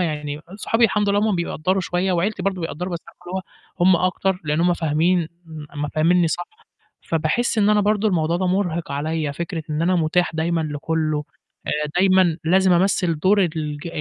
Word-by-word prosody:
يعني 150 -3 -3 0.2
صحابي 225 +2 +1
الحمد 210 -1 +2
لله 200 - +2
هُم - - +1
بيقدّروا 175 +2 -1
شوية 180 +1 -1
وعيلتي 190 +5 -1
برضه 190 -2 -1
بيقدّروا 175 +3 -4
بس 170 - -2
عارفة - - -18
اللي 180 - -6
هو 190 - -3 0.4
هُم 180 0 +6
أكتر، 190 +1 -1
لإن 150 +2 0
هُم 175 +1 +3
فاهمين 165 +2 +1 0.2
م 155 -2 -9 0.2
م 150 - -1
فهمنّي 165 +3 +2
صح، 175 +2 -2 0.6
فباحس 165 +10 0
إن 205 -1 +4
أنا 210 -1 +4
برضه 210 +1 +2
الموضوع 170 -3 +1
ده 185 0 0
مُرهِق 175 -5 -1
عليّا 155 +1 -2
فكرة 165 +1 -5
إن 150 +1 -1
أنا 180 +2 +2
متاح 170 +2 +1
دايمًا 165 +1 0
لكُلّه، 155 0 -2 0.4
آآ 150 0 -1
دايمًا 185 -3 +4
لازم 185 +2 +4
أمثل 175 -3 +1
دور 195 +4 +4
الج 155 -2 -3
170 Hz, 185 wpm, -22 LUFS, 155-190 Hz, 0.6 s, هُم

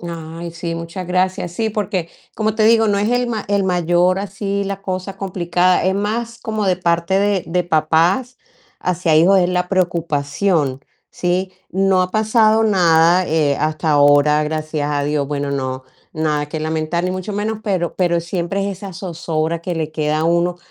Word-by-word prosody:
Ay, 170 0 -7
sí, 170 0 -4
muchas 170 +2 -6
gracias. 185 0 -1
Sí, 220 +4 -1
porque 200 -5 -2 0.3
como 215 -1 -1
te 220 -1 +2
digo, 225 0 +4
no 200 - +2
es 205 +2 0
el 245 0 +1
ma 220 -3 -3
el 200 -1 +2
mayor, 180 0 +2
así 200 0 -3
la 195 0 -4
cosa 185 +1 -4
complicada, 180 -2 +1
es 190 +1 +2
más, 230 +4 -2
como 215 -2 -3
de 185 -1 +2
parte 170 +1 +1
de 200 -2 +1
de 180 +2 0
papás 170 +10 +1 0.4
hacia 180 -2 0
hijos, 180 +5 +5
es 175 -1 +2
la 180 0 -1
preocupación, 165 -4 0 0.3
¿sí? 185 +1 -1 0.2
No 190 0 +2
ha 180 - -3
pasado 220 +1 +3
nada, 175 -3 +4
eh, 150 -3 +2
hasta 155 0 0
ahora, 145 +1 +4
gracias 155 -1 -2
a 145 -1 0
Dios. 145 -1 -1
Bueno, 145 -1 -2
no, 130 -1 -3 0.3
nada 150 -2 -1
que 155 +2 -5
lamentar, 155 +2 -2
ni 180 - 0
mucho 185 +2 -5
menos. 210 +2 -2
Pero 185 -5 -1
pero, 175 -2 +1
siempre, 180 +3 -2
es 195 -3 -5
esa 200 -1 -8
zozobra 165 -2 -3
que 175 +1 -4
le 155 -1 -3
queda 155 -1 0
a - - 0
uno, 170 +1 +1
175 Hz, 180 wpm, -19 LUFS, 160-195 Hz, 0.4 s, hijos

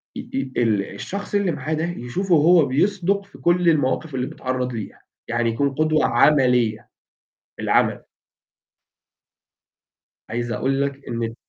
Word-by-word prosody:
ي - - -7
ي 135 0 -2
ال 105 -4 +1
الشخص 200 +1 -5
اللي 200 -3 +2
معاه 150 +1 -3
ده 155 +1 -1
يشوفه 175 +4 -1
هو 160 0 +5
بِيصدُق 195 +7 0
في 200 - -16
كل 175 0 +2
المواقف 150 -1 0
اللي 125 0 -1
بيتعرض 130 -1 -3
ليها، 110 -3 -7 0.3
يعني 120 0 0
يكون 140 +5 0
قدوة 155 +1 +2
عملية، 125 -7 +3 0.7
بالعمل. - - +1 2.3
عايز 120 +1 -3
أقول 135 +2 0
لك 140 0 -4
إن 115 0 -3
ال 115 0 -4
140 Hz, 135 wpm, -22 LUFS, 120-170 Hz, 2.3 s, هو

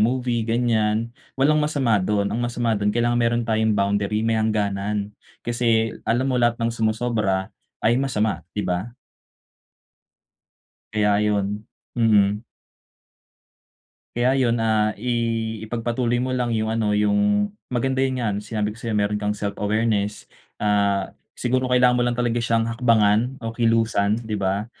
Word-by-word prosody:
movie, 120 +1 +1
ganiyan. 115 -1 0 0.2
Walang 150 +3 +3
masama 135 -8 +1
do'n. 100 +1 0
Ang 115 - -1
masama 120 -1 -1
do'n 105 -1 0
kailangan 120 +2 +1
mayro'n 120 0 +1
tayong 110 -1 +1
boundary, 100 +2 0
may 115 -1 +1
hangganan. 105 -1 -1 0.3
Kasi 115 -2 +1 0.2
alam 120 +3 +2
mo 130 -2 +1
lahat 120 0 +2
ng 115 0 -1
sumusobra 110 -4 -1 0.3
ay 120 +3 +3
masama, 110 -6 0 0.2
'di 105 - -1
ba? 90 +6 -3 2.0
Kaya 105 -1 +2
'yon. 105 0 -1 0.3
Mhm. 105 -2 +3 1.7
Kaya 120 +1 +2
yun, 120 -2 +2
ah, 110 -1 +2
i 120 - -7 0.6
ipagpatuloy 120 +1 -1
mo 130 +1 -1
lang 125 -1 0
yung 110 0 -1
ano, 105 -2 +1
yung, 205 - +2 0.2
maganda 130 +2 0
yun 130 -1 0
nga, 115 -4 -1
yung 100 - -3
sinabi 105 0 -3
ko - - -16
sa'yo 110 -2 -1
meron 105 +1 0
kang 105 0 -1
self 100 0 -3
awareness, 105 -1 0 0.3
ah, 100 -2 +1 0.2
siguro 130 +1 0
kailangan 125 0 +4
mo 125 - +1
lang 120 0 0
talaga 120 -1 0
syang 115 -1 +1
hakbangan, 115 +1 +2
o 115 -1 -5
kilusan, 115 -3 +2
'di 110 - -4
ba? 100 0 -1
115 Hz, 145 wpm, -23 LUFS, 105-120 Hz, 2.0 s, kailangan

